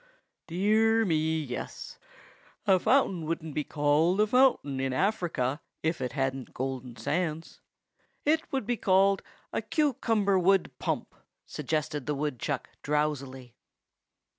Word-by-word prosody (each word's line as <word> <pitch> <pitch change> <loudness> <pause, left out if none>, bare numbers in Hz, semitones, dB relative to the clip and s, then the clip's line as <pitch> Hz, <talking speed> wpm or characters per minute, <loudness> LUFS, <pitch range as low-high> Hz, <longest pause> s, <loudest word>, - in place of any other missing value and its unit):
"Dear 220 +5 +3
me, 160 -2 +1
yes. 125 -3 -7 0.7
A 190 -3 +5
fountain 195 -8 +2
wouldn't 160 -2 -3
be 150 - -1
called 150 +6 +2
a 210 - +5
fountain 230 - +3
in 135 -1 -1
Africa 150 - 0 0.2
if 160 +2 0
it 125 - -3
hadn't 135 -2 -2
golden 130 -2 -4
sands. 155 +6 -3 0.6
It 315 +2 +1
would 265 -5 -1
be 240 +1 0
called 195 0 +3 0.3
a - - 0
cucumber 225 - +1
wood 190 +1 +3
pump," - - -2 0.3
suggested 150 -1 -3
the 150 - 0
woodchuck 145 -4 -3
drowsily. 140 -4 -2
160 Hz, 120 wpm, -29 LUFS, 140-200 Hz, 0.7 s, A